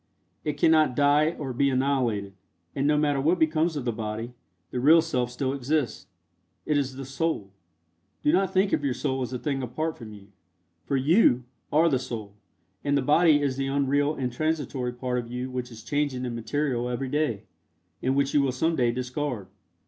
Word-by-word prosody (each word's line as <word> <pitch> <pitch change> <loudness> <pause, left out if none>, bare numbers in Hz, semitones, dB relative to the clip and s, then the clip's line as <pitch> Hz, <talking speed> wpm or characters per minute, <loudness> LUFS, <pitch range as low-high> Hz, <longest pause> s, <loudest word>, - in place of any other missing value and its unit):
It 150 - -1
cannot 155 -4 +4
die 145 +3 +3
or 135 -4 -4
be 140 +3 +2
annihilated, 130 -7 0 0.4
and 140 +1 +1
no 150 0 +3
matter 145 -2 +1
what 165 +6 +3
becomes 160 0 +2
of 140 -4 -3
the 120 - +1
body, 110 +1 -5 0.4
the 125 - -2
real 155 +6 +7
Self 130 -7 0
still 130 +2 -2
exists. 130 -8 -1 0.6
It 150 - +1
is 135 -2 0
the 135 0 -6
Soul. 135 -7 -2 0.7
Do 150 - +4
not 190 +1 +2
think 190 +1 +2
of - - +1
your 135 -3 0
Soul 135 -2 -2
as 125 - -3
a 125 - -2
thing 135 0 -2
apart 155 +6 -3
from 110 -3 -9
you, 100 -1 -13 0.6
for 140 - 0
YOU 135 - +4 0.3
are 160 +3 +4
the 135 -6 +2
Soul, 115 -5 -6 0.5
and 145 0 +2
the 140 - 0
body 150 +1 +4
is 135 -2 0
the 135 0 -1
unreal 140 +2 +1
and 125 -3 -3
transitory 145 -4 -1
part 125 0 -2
of 120 -1 -7
you 125 +1 -4
which 125 -1 -4
is 115 -2 -11
changing 140 -1 -1
in 120 - -3
material 125 +1 -1
every 125 +2 -2
day, 145 -8 -1 0.6
and 130 +1 +1
which 140 0 +1
you 145 - +4
will 135 -2 +1
some 160 +6 +1
day 120 -4 +2
discard. 125 -2 -3
135 Hz, 195 wpm, -26 LUFS, 125-150 Hz, 0.7 s, real